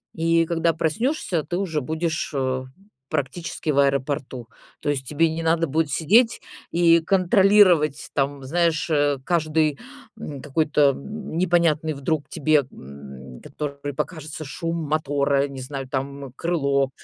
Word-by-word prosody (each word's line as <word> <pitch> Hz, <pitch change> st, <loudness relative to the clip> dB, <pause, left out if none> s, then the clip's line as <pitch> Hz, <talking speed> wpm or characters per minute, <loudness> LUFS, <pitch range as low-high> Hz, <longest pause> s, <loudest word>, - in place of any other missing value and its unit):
И 165 Hz, 0 st, +2 dB
когда 165 Hz, 0 st, +1 dB
проснешься, 170 Hz, -, -1 dB
ты 175 Hz, +4 st, -3 dB
уже 165 Hz, -6 st, -1 dB
будешь, 160 Hz, +4 st, -2 dB
э, 130 Hz, -1 st, -1 dB, 0.4 s
практически 155 Hz, +3 st, -3 dB
в 140 Hz, -2 st, +2 dB
аэропорту. 135 Hz, -3 st, -1 dB, 0.3 s
То -, -, -2 dB
есть 135 Hz, -3 st, -2 dB
тебе 160 Hz, +4 st, +2 dB
не 165 Hz, -, -3 dB
надо 165 Hz, +1 st, +2 dB
будет 155 Hz, +2 st, 0 dB
сидеть 225 Hz, -, +3 dB, 0.3 s
и 170 Hz, -1 st, +5 dB
контролировать, 185 Hz, -4 st, +4 dB
там, 140 Hz, 0 st, -1 dB
знаешь, 165 Hz, +3 st, 0 dB
э, 145 Hz, -2 st, +2 dB
каждый, 155 Hz, -2 st, +1 dB, 0.4 s
м, 140 Hz, -3 st, -7 dB
какой-то 150 Hz, 0 st, +2 dB
н 205 Hz, +5 st, -7 dB
непонятный 165 Hz, -3 st, +2 dB
вдруг 145 Hz, +2 st, -2 dB
тебе, 150 Hz, -2 st, +2 dB
м, 65 Hz, -2 st, -11 dB
который 145 Hz, -1 st, -6 dB
покажется 155 Hz, +1 st, -5 dB
шум 165 Hz, +4 st, -4 dB
мотора, 140 Hz, -2 st, +1 dB
не 135 Hz, -2 st, -8 dB
знаю, 135 Hz, 0 st, -6 dB
там, 135 Hz, 0 st, -5 dB
крыло, 140 Hz, -5 st, 0 dB
150 Hz, 135 wpm, -23 LUFS, 140-165 Hz, 0.4 s, и